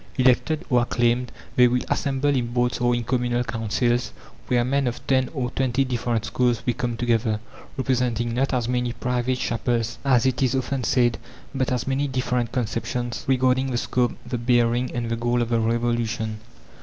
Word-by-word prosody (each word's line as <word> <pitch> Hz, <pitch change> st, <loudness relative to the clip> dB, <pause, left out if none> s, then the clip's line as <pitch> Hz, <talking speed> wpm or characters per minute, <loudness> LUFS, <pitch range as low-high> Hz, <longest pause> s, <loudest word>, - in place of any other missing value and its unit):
Elected 130 Hz, +6 st, +2 dB
or 125 Hz, -3 st, +3 dB
acclaimed, 120 Hz, +1 st, +1 dB, 0.2 s
they 125 Hz, 0 st, +7 dB
will 125 Hz, +1 st, 0 dB
assemble 140 Hz, +1 st, 0 dB
in 125 Hz, -4 st, 0 dB
Boards 120 Hz, +1 st, 0 dB
or 120 Hz, 0 st, +3 dB
in 120 Hz, -, -2 dB
Communal 120 Hz, 0 st, 0 dB
Councils, 120 Hz, +1 st, -1 dB, 0.3 s
where 120 Hz, -1 st, +2 dB
men 135 Hz, +1 st, +1 dB
of 120 Hz, -, -4 dB
ten 130 Hz, -1 st, +2 dB
or 130 Hz, -5 st, -3 dB
twenty 130 Hz, 0 st, +1 dB
different 120 Hz, -3 st, -1 dB
schools 125 Hz, -2 st, 0 dB
will 120 Hz, -, +1 dB
come 120 Hz, 0 st, -3 dB
together, 115 Hz, -2 st, +1 dB, 0.4 s
representing 125 Hz, -3 st, 0 dB
not 130 Hz, +3 st, +1 dB
as 125 Hz, -3 st, 0 dB
many 125 Hz, -1 st, 0 dB
"private 125 Hz, +1 st, -1 dB
chapels," 115 Hz, -1 st, -1 dB
as 130 Hz, -4 st, +3 dB
it 130 Hz, -1 st, +1 dB
is 130 Hz, -1 st, +2 dB
often 130 Hz, 0 st, -1 dB
said, 120 Hz, -1 st, +2 dB, 0.3 s
but 130 Hz, -2 st, -1 dB
as 125 Hz, -1 st, -1 dB
many 135 Hz, +2 st, 0 dB
different 125 Hz, -3 st, -1 dB
conceptions 120 Hz, 0 st, -2 dB
regarding 130 Hz, 0 st, +2 dB
the 125 Hz, -, -1 dB
scope, 120 Hz, 0 st, 0 dB
the 125 Hz, -, -3 dB
bearing, 120 Hz, +1 st, +2 dB
and 120 Hz, -1 st, -2 dB
the -, -, +1 dB
goal 120 Hz, +1 st, 0 dB
of 120 Hz, -1 st, 0 dB
the 115 Hz, -1 st, +2 dB
revolution. 115 Hz, -1 st, -1 dB
120 Hz, 180 wpm, -24 LUFS, 120-130 Hz, 0.4 s, they